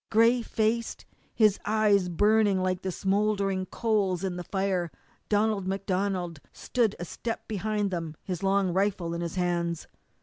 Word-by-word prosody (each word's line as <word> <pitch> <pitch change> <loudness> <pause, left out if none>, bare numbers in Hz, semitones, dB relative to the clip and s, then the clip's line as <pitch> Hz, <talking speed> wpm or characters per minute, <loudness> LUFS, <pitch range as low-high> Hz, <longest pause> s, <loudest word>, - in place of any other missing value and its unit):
Gray 230 +3 +4
faced, 230 0 -1 0.3
his 215 -3 +4
eyes 205 -3 +3
burning 205 +1 +3
like 185 0 0
the 190 - -2
smouldering 195 0 0
coals 200 -6 0
in 185 -2 -2
the 180 - -5
fire, 190 -2 -1 0.4
Donald 210 -2 +1
MacDonald 190 -3 -1
stood 230 -5 0
a 175 - -5
step 230 +5 -5
behind 210 -1 -1
them, 165 -3 -4
his 180 -3 -4
long 195 -2 +2
rifle 190 -3 0
in 170 - -3
his 170 0 -4
hands. 170 -2 -1
195 Hz, 145 wpm, -28 LUFS, 180-215 Hz, 0.4 s, Gray